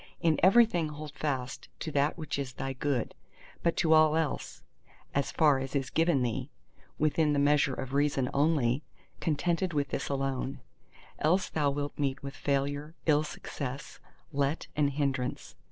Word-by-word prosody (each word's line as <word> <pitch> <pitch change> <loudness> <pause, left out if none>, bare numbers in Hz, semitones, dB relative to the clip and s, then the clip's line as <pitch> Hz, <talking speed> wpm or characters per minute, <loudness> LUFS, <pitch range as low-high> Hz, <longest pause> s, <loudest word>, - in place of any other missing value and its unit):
In 165 -3 +2
everything 190 -4 +5
hold 150 0 -7
fast 135 -5 -3
to 155 - -3
that 145 +2 +1
which 155 -3 -3
is 130 -2 -4
thy 135 +1 -4
Good—but 140 +5 -3
to 160 -1 +4
all 155 -1 +6
else 160 -3 -2 0.5
(as 140 -1 0
far 150 -4 +4
as 135 +2 -5
is 135 -2 -1
given 165 -5 +3
thee) 120 -2 -2 0.5
within 155 0 +2
the - - +1
measure 145 -1 +3
of 135 0 -5
Reason 140 -2 +2
only, 140 -3 +2 0.4
contented 170 +3 0
with 145 -2 0
this 135 - -3
alone. 135 -1 -2 0.6
Else 180 +5 +2
thou 150 -2 +2
wilt 145 +1 -3
meet 140 -1 -1
with 140 0 -5
failure, 145 +2 -1
ill 150 -2 +4
success, 140 -2 -6 0.3
let 140 +2 0
and 150 -1 +3
hindrance. 135 -3 -2
145 Hz, 155 wpm, -30 LUFS, 135-155 Hz, 0.6 s, all